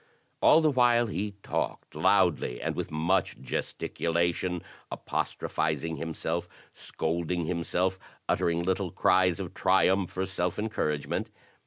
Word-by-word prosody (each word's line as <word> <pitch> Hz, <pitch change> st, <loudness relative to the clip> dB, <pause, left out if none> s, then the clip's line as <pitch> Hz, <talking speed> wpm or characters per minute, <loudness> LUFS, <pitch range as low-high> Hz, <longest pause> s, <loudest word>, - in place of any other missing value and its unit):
All 160 Hz, -, +7 dB
the 155 Hz, -1 st, +3 dB
while 120 Hz, -2 st, +4 dB
he 105 Hz, -2 st, -3 dB
talked -, -, -3 dB
loudly -, -, +2 dB
and -, -, -2 dB
with -, -, -3 dB
much 80 Hz, +5 st, 0 dB
gesticula 85 Hz, +1 st, -1 dB
tion, 90 Hz, 0 st, -3 dB, 0.3 s
apostrophizing 80 Hz, +1 st, -2 dB
himself, 80 Hz, +1 st, -3 dB, 0.2 s
scolding 85 Hz, +2 st, -2 dB
himself, 90 Hz, +2 st, -1 dB, 0.3 s
uttering 85 Hz, 0 st, +1 dB
little 95 Hz, +1 st, 0 dB
cries 90 Hz, 0 st, +3 dB
of -, -, -5 dB
triumph 95 Hz, 0 st, +2 dB
or 95 Hz, -, +1 dB
self 90 Hz, -2 st, -2 dB
encouragement. 75 Hz, -9 st, -2 dB
90 Hz, 120 wpm, -28 LUFS, 80-95 Hz, 0.3 s, All